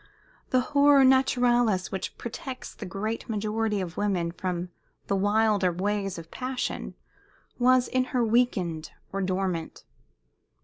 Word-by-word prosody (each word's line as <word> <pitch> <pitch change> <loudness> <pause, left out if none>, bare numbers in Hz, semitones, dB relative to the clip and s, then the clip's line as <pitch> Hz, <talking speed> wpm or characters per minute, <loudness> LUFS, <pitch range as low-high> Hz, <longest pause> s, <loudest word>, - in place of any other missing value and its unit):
The 255 - +3
horror 285 -1 +6
naturalis 245 -6 +3
which 190 - -4
protects 255 +2 -7
the 205 - -8
great 215 +6 -4
majority 215 0 -1
of 175 -2 -6
women 185 -5 0
from 180 0 -3 0.4
the 200 - 0
wilder 205 -1 +2
ways 195 +1 -2
of 165 -1 -10
passion 255 0 -4 0.6
was 250 0 +4
in 255 -1 +1
her 250 -2 0
weakened 195 -9 0 0.2
or 195 - -1
dormant. 185 -3 -2
210 Hz, 125 wpm, -27 LUFS, 185-245 Hz, 0.6 s, horror